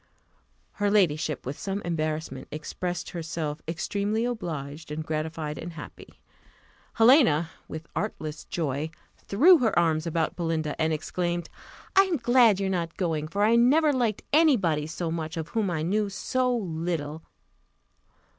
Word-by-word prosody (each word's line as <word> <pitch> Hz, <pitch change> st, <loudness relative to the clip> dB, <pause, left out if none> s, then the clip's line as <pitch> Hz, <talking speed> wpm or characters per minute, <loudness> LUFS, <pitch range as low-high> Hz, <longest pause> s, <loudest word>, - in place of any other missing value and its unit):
Her 205 Hz, -1 st, 0 dB
ladyship, 160 Hz, -7 st, +1 dB
with 135 Hz, +3 st, -5 dB
some 195 Hz, 0 st, -3 dB
embarrassment, 155 Hz, -2 st, -3 dB
expressed 175 Hz, +3 st, -4 dB
herself 160 Hz, -2 st, -4 dB
"extremely 205 Hz, +6 st, -1 dB
obliged, 160 Hz, -, -5 dB
and 155 Hz, +1 st, -4 dB
gratified, 155 Hz, -1 st, -3 dB
and 170 Hz, +1 st, -6 dB
happy." 155 Hz, -, -11 dB, 0.7 s
Helena, 225 Hz, -, +5 dB, 0.2 s
with 160 Hz, +1 st, -7 dB
artless 155 Hz, -4 st, -4 dB
joy, 150 Hz, -2 st, -2 dB, 0.3 s
threw 320 Hz, -, +5 dB
her 225 Hz, -7 st, +1 dB
arms 165 Hz, -1 st, +2 dB
about 165 Hz, -1 st, -1 dB
Belinda, 165 Hz, -3 st, -1 dB
and 160 Hz, 0 st, +2 dB
exclaimed, 175 Hz, +2 st, -2 dB, 0.5 s
"I 390 Hz, +1 st, +7 dB
am 360 Hz, -4 st, 0 dB
glad 240 Hz, -4 st, +5 dB
you 195 Hz, -, 0 dB
are -, -, 0 dB
not 170 Hz, -3 st, -2 dB
going; 160 Hz, -5 st, -1 dB
for 200 Hz, +5 st, -1 dB
I 225 Hz, +2 st, +5 dB
never 290 Hz, +6 st, +5 dB
liked 235 Hz, -6 st, 0 dB
any 310 Hz, -3 st, +6 dB
body 155 Hz, -6 st, 0 dB
so 165 Hz, +1 st, -3 dB
much, 160 Hz, 0 st, -4 dB
of 160 Hz, -1 st, -4 dB
whom 220 Hz, -4 st, 0 dB
I 160 Hz, -3 st, -1 dB
knew 205 Hz, +4 st, 0 dB
so 250 Hz, +6 st, 0 dB
little." 165 Hz, -5 st, -3 dB
170 Hz, 145 wpm, -27 LUFS, 155-215 Hz, 0.7 s, I